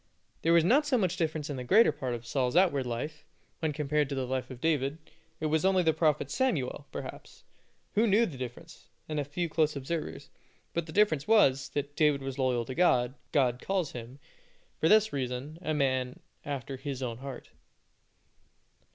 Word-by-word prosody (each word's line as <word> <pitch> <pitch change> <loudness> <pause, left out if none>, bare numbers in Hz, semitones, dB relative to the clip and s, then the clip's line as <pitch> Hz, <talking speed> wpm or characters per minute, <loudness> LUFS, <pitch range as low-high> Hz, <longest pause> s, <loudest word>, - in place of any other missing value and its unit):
There 165 - +3
was 170 -1 +6
not 280 - +4
so 265 -3 +3
much 185 -5 +1
difference 155 -4 -2
in 145 - -4
the 125 - -4
greater 205 - +5
part 130 -4 -3
of 120 0 -9
Saul's 125 +2 -1
outward 145 -8 +3
life, 150 +6 -4 0.4
when 160 -2 0
compared 150 -1 0
with 140 - -3
the 130 - -1
life 130 0 -3
of 130 -2 -9
David. 145 -1 0 0.4
It 155 - -3
was 155 +1 +1
only 190 -1 +3
the 160 -1 +3
prophet 155 -1 +1
Samuel, 145 - -1
perhaps, - - -8 0.5
who 225 +2 +3
knew 215 +3 +4
the 165 - -6
difference, 125 -2 -8 0.2
and 155 -1 -2
a - - 0
few 160 +5 -3
close 155 -1 +1
observers; 140 0 -4 0.4
but 170 -1 -2
the - - -8
difference 160 -7 +2
was, 140 -12 +4
that 145 0 -3
David 150 -4 +2
was 135 0 -5
loyal 125 -3 +1
to 130 - -5
God, 125 -7 +3
and - - -22 0.2
God 125 -5 +2
calls 190 -6 -1
him, 120 +2 -8 0.6
for - - +3
this 215 0 +5
reason, 135 +3 -4
a 155 -3 -1
man 130 0 0 0.2
after 140 -2 -5
His 135 -1 -5
own 115 -2 -4
heart. 135 -1 -8
145 Hz, 190 wpm, -30 LUFS, 130-165 Hz, 0.6 s, was